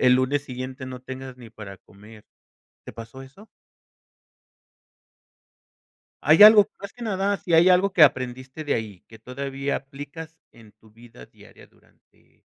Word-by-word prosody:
el 125 Hz, 0 st, +4 dB
lunes 135 Hz, +3 st, 0 dB
siguiente 130 Hz, 0 st, -8 dB
no 130 Hz, -1 st, -9 dB
tengas 130 Hz, 0 st, -9 dB
ni 120 Hz, -3 st, -14 dB
para 100 Hz, -3 st, -11 dB
comer. 105 Hz, +2 st, -18 dB, 0.6 s
¿Te -, -, -9 dB
pasó 115 Hz, +3 st, -11 dB
eso? 190 Hz, +12 st, -16 dB, 2.8 s
¿Hay -, -, +5 dB
algo 210 Hz, -1 st, +8 dB
más 200 Hz, 0 st, -9 dB
que 245 Hz, -, -13 dB
nada, 200 Hz, -1 st, -1 dB
si 170 Hz, -3 st, -3 dB
hay 170 Hz, +3 st, +5 dB
algo 185 Hz, +2 st, +3 dB
que 170 Hz, -, +3 dB
aprendiste 130 Hz, +1 st, 0 dB
de 145 Hz, -, -1 dB
ahí 105 Hz, -5 st, -6 dB
que 110 Hz, -1 st, -17 dB
todavía 135 Hz, +3 st, -5 dB
aplicas 145 Hz, +4 st, -10 dB
en 110 Hz, -3 st, -19 dB
tu 110 Hz, 0 st, -24 dB
vida 115 Hz, -, -16 dB
diaria -, -, -19 dB
durante, -, -, -32 dB
130 Hz, 150 wpm, -23 LUFS, 115-160 Hz, 2.8 s, algo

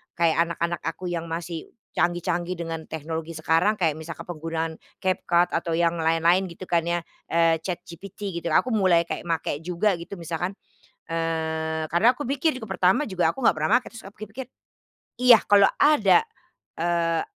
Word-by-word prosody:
kayak 170 Hz, -2 st, +2 dB
anak-anak 170 Hz, 0 st, -2 dB
aku 175 Hz, +2 st, -4 dB
yang 170 Hz, -1 st, -3 dB
masih 165 Hz, 0 st, -5 dB, 0.2 s
canggih-canggih 175 Hz, +1 st, -1 dB
dengan 165 Hz, -1 st, -6 dB
teknologi 160 Hz, +1 st, -5 dB
sekarang, 165 Hz, +6 st, +2 dB
kayak 160 Hz, -6 st, 0 dB
misalkan 160 Hz, +1 st, -7 dB
penggunaan 165 Hz, -1 st, -4 dB, 0.2 s
CapCut 175 Hz, -2 st, +2 dB
atau 165 Hz, 0 st, -1 dB
yang 170 Hz, 0 st, +1 dB
lain-lain 165 Hz, +3 st, +3 dB
gitu 170 Hz, +1 st, -10 dB
kan 170 Hz, -2 st, 0 dB
ya, 170 Hz, 0 st, 0 dB, 0.2 s
eee, 165 Hz, -1 st, +3 dB
ChatGPT 180 Hz, +2 st, -6 dB
gitu 170 Hz, -, -5 dB
aku 255 Hz, -, +3 dB
mulai 185 Hz, -6 st, +4 dB
kayak 170 Hz, -, -6 dB
make 160 Hz, -3 st, -1 dB
juga 180 Hz, +5 st, 0 dB
gitu 170 Hz, +4 st, -8 dB
misalkan, 175 Hz, +2 st, -4 dB, 0.5 s
eee, 160 Hz, -1 st, -2 dB
karena 175 Hz, +10 st, +4 dB
aku 260 Hz, +1 st, -6 dB
pikir 280 Hz, +4 st, +1 dB
juga 255 Hz, -6 st, -7 dB
pertama 185 Hz, +11 st, +3 dB
juga 185 Hz, -4 st, +1 dB
aku -, -, -11 dB
nggak 245 Hz, -, +3 dB
pernah 155 Hz, +4 st, -1 dB
make, 250 Hz, -, -14 dB
terus 225 Hz, -, -10 dB
aku 195 Hz, +1 st, -13 dB
pikir-pikir, 250 Hz, +4 st, -9 dB, 0.7 s
iya 245 Hz, -2 st, +9 dB
kalau 200 Hz, -1 st, +6 dB
ada, 290 Hz, -, +5 dB, 0.5 s
eee, 170 Hz, -1 st, 0 dB
170 Hz, 160 wpm, -25 LUFS, 165-190 Hz, 0.7 s, iya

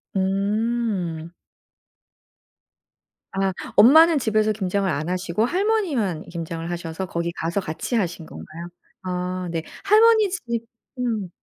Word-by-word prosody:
음. 195 Hz, -3 st, -1 dB, 2.0 s
아. 195 Hz, -1 st, 0 dB, 0.2 s
엄마는 315 Hz, +6 st, +7 dB
집에서 215 Hz, -2 st, +2 dB
김장을 195 Hz, -1 st, -1 dB
안 155 Hz, +3 st, -2 dB
하시고 185 Hz, +3 st, 0 dB
할머니만 335 Hz, -, 0 dB
김장을 165 Hz, -1 st, -5 dB
하셔서 170 Hz, +1 st, -4 dB
거기 170 Hz, -1 st, -3 dB
가서 170 Hz, +4 st, -2 dB
같이 170 Hz, +8 st, -4 dB
하신 175 Hz, -5 st, -1 dB
건가요? 165 Hz, +2 st, -9 dB, 0.4 s
아 180 Hz, 0 st, -3 dB
네. 165 Hz, -1 st, -2 dB, 0.2 s
할머니 435 Hz, 0 st, +5 dB
집 365 Hz, -5 st, -5 dB, 0.6 s
음. 220 Hz, -7 st, -1 dB
190 Hz, 225 characters per minute, -23 LUFS, 170-235 Hz, 2.0 s, 엄마는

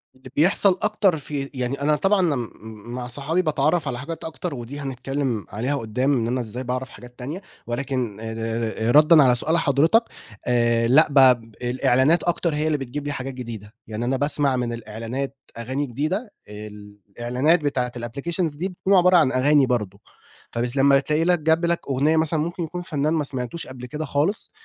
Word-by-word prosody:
اللي 130 Hz, 0 st, -14 dB
بيحصل 185 Hz, +4 st, +4 dB
أكتر 210 Hz, -5 st, +2 dB
في 140 Hz, -1 st, -4 dB
يعني 130 Hz, +1 st, -3 dB
أنا 150 Hz, +1 st, +3 dB
طبعًا 195 Hz, +6 st, +2 dB
أنا 170 Hz, -6 st, +2 dB
م 120 Hz, -3 st, -4 dB, 0.4 s
مع 125 Hz, 0 st, -4 dB
صحابي 145 Hz, +8 st, -1 dB
باتعرّف 155 Hz, -1 st, +1 dB
على 125 Hz, -3 st, -3 dB
حاجات 160 Hz, +5 st, -6 dB
أكتر 160 Hz, +1 st, -5 dB
ودي 125 Hz, +4 st, -7 dB
هنتكلّم 135 Hz, -3 st, -3 dB
عليها 125 Hz, +7 st, -2 dB
قُدّام 125 Hz, +3 st, 0 dB
إن 115 Hz, -4 st, 0 dB
أنا 125 Hz, +2 st, -1 dB
إزاي 120 Hz, +2 st, -6 dB
باعرف 130 Hz, +1 st, -3 dB
حاجات 125 Hz, +2 st, -14 dB
تانية، 145 Hz, +10 st, -5 dB, 0.3 s
ولكن 120 Hz, -3 st, -3 dB
آآ 110 Hz, 0 st, -5 dB, 0.5 s
آآ -, -, +3 dB
ردًا 150 Hz, +2 st, +7 dB
على 125 Hz, -2 st, +4 dB
سؤال 160 Hz, +7 st, +1 dB
حضرتك، 165 Hz, -, +3 dB, 0.4 s
آآ 120 Hz, -1 st, +2 dB
لأ 135 Hz, +7 st, +6 dB
ب 145 Hz, -, -2 dB, 0.5 s
الإعلانات 130 Hz, +5 st, +2 dB
أكتر 170 Hz, -2 st, 0 dB
هي 150 Hz, +1 st, 0 dB
اللي 155 Hz, -1 st, +1 dB
بتجيب 140 Hz, +2 st, -6 dB
لي -, -, -1 dB
حاجات 135 Hz, -1 st, -5 dB
جديدة، 115 Hz, -5 st, -8 dB
يعني 110 Hz, +2 st, -4 dB
أنا 130 Hz, +2 st, 0 dB
باسمع 145 Hz, -1 st, +1 dB
من 120 Hz, -2 st, -2 dB
الإعلانات 115 Hz, +5 st, -5 dB, 0.2 s
أغاني 130 Hz, +5 st, -2 dB
جديدة 155 Hz, -, -3 dB, 0.2 s
آآ، 105 Hz, +1 st, -8 dB
الإعلانات 105 Hz, -, -1 dB
بتاعة 130 Hz, -4 st, -1 dB
الapplications 145 Hz, +7 st, -3 dB
دي 185 Hz, +5 st, -2 dB
بتكون 190 Hz, +1 st, -1 dB
عبارة 180 Hz, 0 st, +6 dB
عن 155 Hz, -6 st, +4 dB
أغاني 140 Hz, +2 st, +4 dB
برضو، 105 Hz, -6 st, -2 dB, 0.5 s
فب 120 Hz, +1 st, -2 dB
لمّا 140 Hz, 0 st, +5 dB
تلاقي 150 Hz, +3 st, 0 dB
لك 175 Hz, 0 st, +3 dB
جاب 160 Hz, +2 st, +2 dB
لك 170 Hz, 0 st, +1 dB
أغنية 145 Hz, +4 st, +2 dB
مثلًا 160 Hz, 0 st, +1 dB
ممكن 170 Hz, +3 st, -2 dB
يكون 170 Hz, +2 st, -5 dB
فنان 155 Hz, -4 st, -1 dB
ما 160 Hz, -2 st, +1 dB
سمعتوش 135 Hz, +3 st, -4 dB
قبل 125 Hz, -1 st, -9 dB
كده 150 Hz, +5 st, -5 dB
خالص، 150 Hz, +9 st, -1 dB
140 Hz, 185 wpm, -23 LUFS, 125-160 Hz, 0.5 s, ردًا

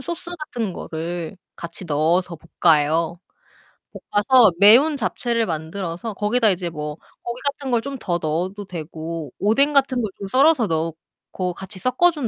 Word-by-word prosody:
소스 345 Hz, +5 st, -5 dB
같은 240 Hz, -, -4 dB
거를 170 Hz, +2 st, -5 dB, 0.2 s
같이 170 Hz, +2 st, -8 dB
넣어서 165 Hz, +3 st, +1 dB, 0.3 s
볶아요. 160 Hz, +1 st, +3 dB, 0.9 s
볶아서 220 Hz, 0 st, +5 dB
매운 255 Hz, +9 st, +7 dB
잡채를 235 Hz, -4 st, -1 dB
만들어서 170 Hz, +5 st, -4 dB
거기다 215 Hz, +3 st, +2 dB
이제 180 Hz, -2 st, -1 dB
뭐 150 Hz, -2 st, -6 dB, 0.2 s
고기 240 Hz, +1 st, -6 dB
같은 280 Hz, -2 st, -2 dB
걸 235 Hz, -1 st, +2 dB
좀 275 Hz, +1 st, -6 dB
더 175 Hz, -7 st, -1 dB
넣어도 180 Hz, +6 st, -2 dB
되고 160 Hz, -3 st, -6 dB
오뎅 230 Hz, +9 st, +3 dB
같은 265 Hz, -3 st, +3 dB
걸 215 Hz, -, -2 dB
좀 200 Hz, -, -6 dB
썰어서 265 Hz, +1 st, +4 dB
넣고 165 Hz, +2 st, -4 dB
같이 190 Hz, +2 st, -9 dB
섞어 255 Hz, -, +3 dB
준 295 Hz, -7 st, -3 dB
195 Hz, 295 characters per minute, -22 LUFS, 165-245 Hz, 0.9 s, 매운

